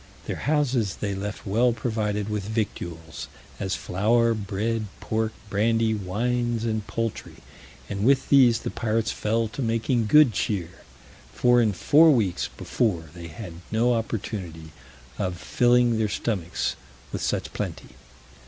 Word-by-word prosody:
Their - - -3
houses 130 - +1
they 100 -1 -3
left 105 +2 -5
well 115 +5 +3
provided 110 -3 -2
with 105 -2 -3
victuals, 85 -7 -4 0.3
as 95 -1 -1
flour, 115 +5 +2
bread, 110 +1 -2
pork, 110 0 -1 0.2
brandy, 110 +2 +2
wines, 115 +4 -1
and 110 -2 -2
poultry, 115 -1 -3 0.5
and 100 0 -3
with 135 +2 +3
these 125 -5 +6
the - - -4
pirates 115 -1 0
fell 115 +1 0
to 110 - -6
making 115 0 +1
good 150 0 +6
cheer, 90 -6 -1 0.6
for 120 0 +4
in 110 -2 +3
four 150 - +5
weeks 110 - +2
before 85 -10 -1
they 85 -1 -8
had 85 +2 -8 0.2
no 120 +3 +3
opportunity 95 -8 -4 0.5
of 90 -3 -2
filling 120 +3 +3
their 110 -1 +1
stomachs 95 -4 -2 0.4
with - - -4
such - - -2
plenty. - - -5
110 Hz, 135 wpm, -25 LUFS, 100-120 Hz, 0.6 s, these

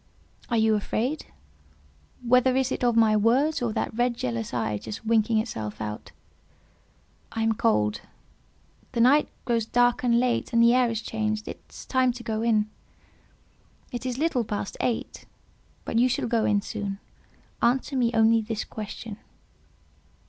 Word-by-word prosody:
"Are 235 - +1
you 220 0 +3
afraid? 230 +7 -2 1.0
Whether 250 +1 +4
is 265 -1 +1
it - - -3
of 240 -1 +3
my 220 -2 +5
words 250 +9 +2
or 235 -2 0
that - - -2
red 240 0 +1
jealous 115 - -3
eye 110 -3 -1
just 220 - -8
winking 225 0 +2
itself 110 - -3
out?" 105 -1 -6 1.2
"I 225 - -1
am 225 0 +2
cold; 105 - +1 0.9
the - - -2
night 270 +6 +5 0.2
grows 230 -3 0
dark 245 +1 +2
and 235 -1 +3
late, 245 -1 0
and 230 0 +5
the 235 +1 +6
air 250 -1 +3
is 225 -1 -3
changed; 215 -1 -2
it - - -7
is - - -11
time 260 -1 +2
to 240 0 -9
go 220 -1 -2
in." 220 -2 +2 1.2
"It 245 +1 -4
is 250 -1 -3
little 290 -5 +1
past 205 -3 -4
eight, 235 - -3 0.6
but 230 - 0
you 250 +2 +4
shall 245 - -1
go 230 -1 +1
in 205 -1 +2
soon. 205 -3 -4 0.6
Answer 255 +4 +1
me 245 -3 +2
only 225 0 +4
this 220 0 -3
question." 215 0 -7
230 Hz, 160 wpm, -26 LUFS, 215-245 Hz, 1.2 s, the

